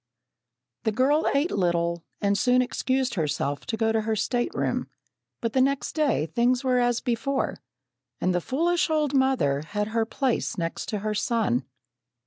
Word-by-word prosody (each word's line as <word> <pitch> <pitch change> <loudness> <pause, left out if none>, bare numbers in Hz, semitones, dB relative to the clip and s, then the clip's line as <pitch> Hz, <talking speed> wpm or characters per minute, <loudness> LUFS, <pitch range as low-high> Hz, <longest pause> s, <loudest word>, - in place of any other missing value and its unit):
The 220 - 0
girl 275 +7 +2
ate 290 +5 +2
little, 170 -2 0 0.2
and 200 -1 +2
soon 250 +3 +3
excused 260 +1 -1
herself 145 -4 -2
to 230 -3 -2
go 225 0 +2
to 220 0 +1
her 220 0 -1
stateroom, 240 +4 -1 0.5
but 230 -1 -2
the 260 - +3
next 275 +1 +1
day 295 - +1
things 240 - +1
were 255 -1 +2
as 245 -1 +1
before, 260 +3 -1 0.6
and 185 - +1
the 175 - +1
foolish 340 - +1
old 305 -3 +1
mother 260 - +2
had 210 +7 -3
her 225 0 0
place 250 -3 -1
next 165 -1 -3
to 210 - -2
her 215 0 -1
son. 210 - 0
235 Hz, 160 wpm, -26 LUFS, 200-265 Hz, 0.6 s, soon